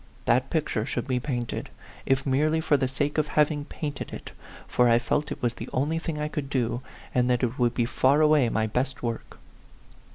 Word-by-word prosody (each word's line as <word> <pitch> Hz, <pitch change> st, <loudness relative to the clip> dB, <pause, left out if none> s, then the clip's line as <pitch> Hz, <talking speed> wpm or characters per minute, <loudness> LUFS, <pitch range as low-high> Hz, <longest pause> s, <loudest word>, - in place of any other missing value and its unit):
That 125 Hz, +2 st, +2 dB
picture 150 Hz, -9 st, 0 dB
should 120 Hz, +3 st, -3 dB
be 130 Hz, -2 st, +1 dB
painted, 125 Hz, -3 st, -3 dB, 0.4 s
if 135 Hz, 0 st, +2 dB
merely 150 Hz, +4 st, +2 dB
for 155 Hz, -2 st, +2 dB
the 135 Hz, -2 st, +1 dB
sake 145 Hz, +3 st, -1 dB
of 150 Hz, -, +1 dB
having 150 Hz, -1 st, +1 dB
painted 145 Hz, -3 st, -5 dB
it; -, -, -8 dB, 0.4 s
for 125 Hz, -1 st, +3 dB
I 115 Hz, -, +6 dB
felt 145 Hz, +5 st, -1 dB
it -, -, -6 dB
was 120 Hz, -1 st, +1 dB
the -, -, -8 dB
only 150 Hz, +5 st, 0 dB
thing 165 Hz, -2 st, -4 dB
I 150 Hz, -, -1 dB
could 150 Hz, -2 st, -4 dB
do, 120 Hz, -2 st, 0 dB, 0.3 s
and 125 Hz, 0 st, +2 dB
that 125 Hz, 0 st, +2 dB
it 125 Hz, +1 st, -1 dB
would 120 Hz, -1 st, +2 dB
be 120 Hz, -, +2 dB
far 130 Hz, +4 st, +3 dB
away 150 Hz, -5 st, +5 dB
my 110 Hz, -1 st, +1 dB
best 125 Hz, +5 st, -2 dB
work. 115 Hz, -1 st, -4 dB
130 Hz, 205 wpm, -26 LUFS, 120-150 Hz, 0.4 s, I